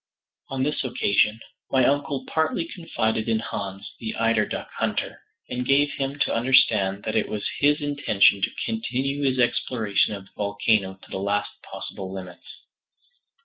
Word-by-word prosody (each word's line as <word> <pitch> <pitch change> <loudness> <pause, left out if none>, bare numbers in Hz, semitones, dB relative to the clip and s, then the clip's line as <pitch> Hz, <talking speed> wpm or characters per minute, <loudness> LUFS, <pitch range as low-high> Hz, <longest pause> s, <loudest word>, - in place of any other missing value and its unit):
On 135 -1 -1
this 150 +1 -1
occasion, 110 -3 +2 0.3
my 130 -2 +4
uncle 140 -1 0
partly 160 +1 0
confided 110 - -2
in 110 - +3
Hans, 100 -3 -5
the 110 -1 -4
eider 115 -1 +2
duck - - -4
hunter, - - -1 0.3
and 125 0 -3
gave 140 +3 +3
him 135 +1 -3
to - - +2
understand 110 -5 +3
that 110 - -2
it 110 - +1
was 105 -1 -3
his 145 +1 +3
intention 105 -9 +3
to - - +2 0.2
continue 140 - -2
his 135 -2 +1
exploration 115 -4 +1
of 100 -1 -9
the - - -23
volcano 100 -1 +1
to - - -16
the - - -3
last 100 +1 0
possible 95 -1 -7
limits. 90 -2 -9
115 Hz, 155 wpm, -25 LUFS, 100-135 Hz, 0.3 s, my